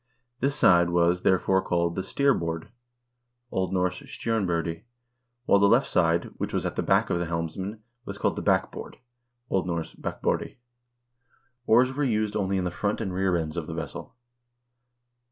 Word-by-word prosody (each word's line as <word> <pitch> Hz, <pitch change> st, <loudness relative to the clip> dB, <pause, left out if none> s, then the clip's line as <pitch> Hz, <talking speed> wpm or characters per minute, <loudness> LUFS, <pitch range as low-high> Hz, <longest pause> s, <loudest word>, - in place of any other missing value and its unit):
This 140 Hz, +1 st, +1 dB
side 85 Hz, -10 st, +5 dB
was, 85 Hz, +1 st, +2 dB
there 95 Hz, -, +4 dB
fore, 95 Hz, +1 st, +1 dB
called 85 Hz, -1 st, 0 dB
the 95 Hz, -, -2 dB
steerboard 95 Hz, -6 st, 0 dB, 0.8 s
(O. 95 Hz, 0 st, 0 dB
N. 90 Hz, -, -7 dB
stjornbordi), 90 Hz, -2 st, -1 dB, 0.6 s
while 100 Hz, -, +5 dB
the 100 Hz, 0 st, +5 dB
left 120 Hz, +5 st, +4 dB
side, 85 Hz, 0 st, +1 dB
which -, -, -3 dB
was -, -, -1 dB
at -, -, -2 dB
the -, -, 0 dB
back -, -, +2 dB
of 85 Hz, -, +1 dB
the 85 Hz, -, -2 dB
helmsman, 90 Hz, +6 st, -4 dB, 0.2 s
was -, -, -7 dB
called -, -, 0 dB
the -, -, -4 dB
backboard -, -, -1 dB, 0.5 s
(O. 95 Hz, -, +3 dB
N. 85 Hz, -3 st, -2 dB, 0.2 s
bakbordi). -, -, -2 dB, 1.1 s
Oars 125 Hz, +4 st, +5 dB
were 145 Hz, +2 st, -1 dB
used 110 Hz, -5 st, 0 dB
only 100 Hz, -2 st, 0 dB
in 95 Hz, -, 0 dB
the 90 Hz, -, -2 dB
front 100 Hz, +4 st, -1 dB
and 100 Hz, -5 st, -3 dB
rear 95 Hz, -1 st, +1 dB
ends 80 Hz, -2 st, -3 dB
of 85 Hz, -3 st, -4 dB
the 80 Hz, -, -5 dB
vessel. 80 Hz, -, -7 dB
90 Hz, 170 wpm, -26 LUFS, 85-105 Hz, 1.1 s, side